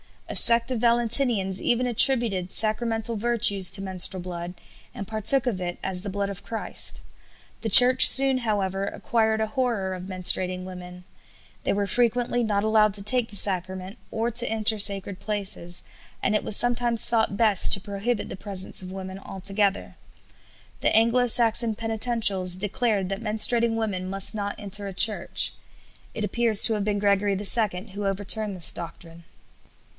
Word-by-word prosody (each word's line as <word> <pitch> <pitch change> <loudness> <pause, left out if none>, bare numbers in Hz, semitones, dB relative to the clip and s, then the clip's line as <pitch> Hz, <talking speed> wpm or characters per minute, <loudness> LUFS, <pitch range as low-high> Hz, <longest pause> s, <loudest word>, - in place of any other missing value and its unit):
A - - -7
sect 235 +1 +3
of 250 - -3
Valentinians 235 -4 0
even 245 +1 -1
attributed 230 -6 0
sacramental 225 +1 -1
virtues 205 -4 +1
to 195 - 0
menstrual 185 -1 -1
blood, 175 0 -8 0.4
and 200 - -7
partook 220 +5 +3
of 225 -7 -3
it 175 -1 -6
as 185 -1 -3
the 200 - -7
blood 200 +1 -4
of 200 - -9
Christ. 225 - -2 0.6
The 225 - -3
Church 250 +5 +10
soon, 270 -1 +6
however, 195 -4 -3
acquired 220 +1 -2
a 220 - -2
horror 215 -5 -3
of 180 -1 -8
menstruating 185 0 -1
women; 180 -1 -11 0.6
they - - 0
were 200 0 -2
frequently 245 +2 -1
not 205 -2 -2
allowed 215 -1 +1
to 200 - +1
take 235 +2 +2
the 205 - -10
sacrament 185 +1 0
or 225 +2 -3
to 240 +1 +1
enter 220 -1 +1
sacred 200 -1 -1
places, 195 -5 -2 0.4
and 205 - 0
it 210 - -1
was 210 - -1
sometimes 240 -1 +1
thought 220 -3 -1
best 215 -4 +3
to 195 - 0
prohibit 205 +3 -5
the - - -9
presence 195 0 -2
of 185 0 -10
women 190 0 -9
altogether. 195 +1 -3 0.8
The - - +1
Anglo 235 +3 +2
Saxon 230 -1 +1
Penitentials 220 -5 -1
declared 205 -1 -2
that 195 +2 -5
menstruating 230 +1 +1
women 195 -5 -4
must 195 +2 +2
not 205 -1 -5
enter 200 -1 -7
a 195 - -8
church. 210 +3 +1 0.6
It 215 - -5
appears 220 +1 +4
to 225 - +2
have 210 -2 -3
been 205 -1 -2
Gregory 200 -1 0
II 205 -1 +1
who 200 0 -5
overturned 205 +1 -2
this 175 -3 +4
doctrine. 170 0 -11
205 Hz, 160 wpm, -23 LUFS, 190-230 Hz, 0.8 s, Church